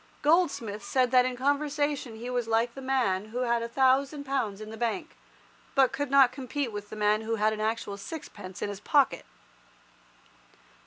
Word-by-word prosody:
Goldsmith 280 Hz, -, +1 dB
said 255 Hz, +2 st, +1 dB
that 250 Hz, -1 st, +5 dB
in 250 Hz, -1 st, -4 dB
conversation 285 Hz, -2 st, 0 dB
he 230 Hz, +2 st, -7 dB
was 245 Hz, -2 st, -1 dB
like 225 Hz, +1 st, +1 dB
the 270 Hz, -, -9 dB
man 245 Hz, -8 st, 0 dB
who 235 Hz, +4 st, -4 dB
had 235 Hz, -1 st, +1 dB
a 230 Hz, -, -3 dB
thousand 270 Hz, +3 st, +2 dB
pounds 255 Hz, -8 st, -2 dB
in 215 Hz, 0 st, -8 dB
the -, -, -7 dB
bank, 240 Hz, +9 st, -3 dB, 0.6 s
but 270 Hz, -2 st, +5 dB
could 285 Hz, 0 st, -3 dB
not 270 Hz, -2 st, +6 dB
compete 260 Hz, 0 st, -3 dB
with 205 Hz, 0 st, -7 dB
the -, -, -7 dB
man 210 Hz, 0 st, +2 dB
who 225 Hz, +1 st, -2 dB
had 215 Hz, 0 st, +2 dB
an 215 Hz, -, -4 dB
actual 215 Hz, -2 st, -2 dB
sixpence 200 Hz, -, -8 dB
in -, -, -2 dB
his 200 Hz, -1 st, -6 dB
pocket. 280 Hz, +5 st, +2 dB
245 Hz, 180 wpm, -28 LUFS, 215-275 Hz, 0.6 s, not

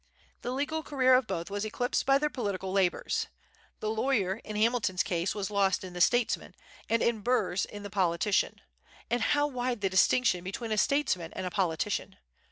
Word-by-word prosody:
The -, -, -4 dB
legal 290 Hz, +5 st, -1 dB
career 260 Hz, -4 st, +3 dB
of 255 Hz, -2 st, +4 dB
both 170 Hz, +3 st, -4 dB
was 205 Hz, 0 st, -2 dB
eclipsed 245 Hz, +5 st, -1 dB
by 275 Hz, 0 st, +6 dB
their 300 Hz, +1 st, -1 dB
political 200 Hz, -6 st, -3 dB
labors. 190 Hz, -2 st, 0 dB, 0.5 s
The 215 Hz, -, -1 dB
lawyer, 220 Hz, -4 st, 0 dB
in 215 Hz, -, -7 dB
Hamilton's 215 Hz, -4 st, +2 dB
case, 175 Hz, -1 st, -1 dB
was 205 Hz, 0 st, -3 dB
lost 195 Hz, -2 st, +2 dB
in 185 Hz, -1 st, -8 dB
the 175 Hz, -, -4 dB
statesman, 240 Hz, +5 st, +2 dB, 0.3 s
and 230 Hz, 0 st, +2 dB
in 235 Hz, -2 st, +1 dB
Burr's 205 Hz, -5 st, +1 dB
in 205 Hz, -1 st, -9 dB
the 205 Hz, -, -7 dB
politician. 190 Hz, 0 st, +1 dB, 0.5 s
And 240 Hz, 0 st, +1 dB
how 290 Hz, +4 st, +2 dB
wide 250 Hz, -4 st, -2 dB
the 195 Hz, -2 st, 0 dB
distinction 190 Hz, 0 st, +3 dB
between 220 Hz, +5 st, -5 dB
a 215 Hz, -, +1 dB
statesman 190 Hz, -, +1 dB
and 185 Hz, -, -4 dB
a 180 Hz, -, -3 dB
politician! 170 Hz, -5 st, -1 dB
210 Hz, 180 wpm, -29 LUFS, 190-250 Hz, 0.5 s, by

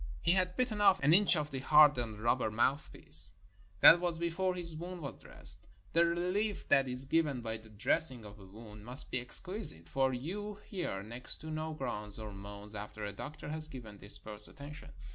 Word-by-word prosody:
He 170 Hz, -, +4 dB
had 185 Hz, 0 st, +1 dB
bitten 240 Hz, -5 st, 0 dB
off 195 Hz, -3 st, +6 dB
an 145 Hz, +3 st, +5 dB
inch 195 Hz, 0 st, +8 dB
of 150 Hz, -1 st, -2 dB
the 135 Hz, -, -3 dB
hardened 130 Hz, -7 st, +5 dB
rubber 120 Hz, 0 st, +2 dB
mouthpiece. 105 Hz, -, -2 dB, 0.5 s
That 170 Hz, -, +10 dB
was 175 Hz, -2 st, -1 dB
before 170 Hz, +2 st, -1 dB
his 170 Hz, -3 st, -5 dB
wound 175 Hz, +2 st, -6 dB
was 140 Hz, -, -5 dB
dressed. -, -, -6 dB, 0.3 s
The 170 Hz, -, +5 dB
relief 180 Hz, +5 st, -1 dB
that 135 Hz, -1 st, +4 dB
is 125 Hz, +1 st, -5 dB
given 150 Hz, -4 st, +1 dB
by 110 Hz, -1 st, -3 dB
the 110 Hz, 0 st, -16 dB
dressing 115 Hz, +3 st, 0 dB
of 105 Hz, 0 st, -11 dB
a 95 Hz, -, -12 dB
wound 105 Hz, +1 st, -12 dB
must 125 Hz, +5 st, -10 dB
be 125 Hz, -, +1 dB
exquisite, 125 Hz, -, -5 dB
for 135 Hz, +8 st, +1 dB
you 195 Hz, +12 st, -4 dB
hear 175 Hz, -, -4 dB
next 120 Hz, +4 st, +1 dB
to 155 Hz, -, -7 dB
no 155 Hz, 0 st, -3 dB
groans 105 Hz, -7 st, -2 dB
or 110 Hz, -2 st, -6 dB
moans 100 Hz, +1 st, -10 dB
after 105 Hz, 0 st, -6 dB
a 100 Hz, -, -5 dB
doctor 150 Hz, 0 st, -8 dB
has 155 Hz, 0 st, +1 dB
given 115 Hz, -8 st, -10 dB
this 100 Hz, +2 st, -1 dB
first 105 Hz, -1 st, -2 dB
attention. 145 Hz, +2 st, -10 dB
135 Hz, 195 wpm, -33 LUFS, 110-170 Hz, 0.5 s, That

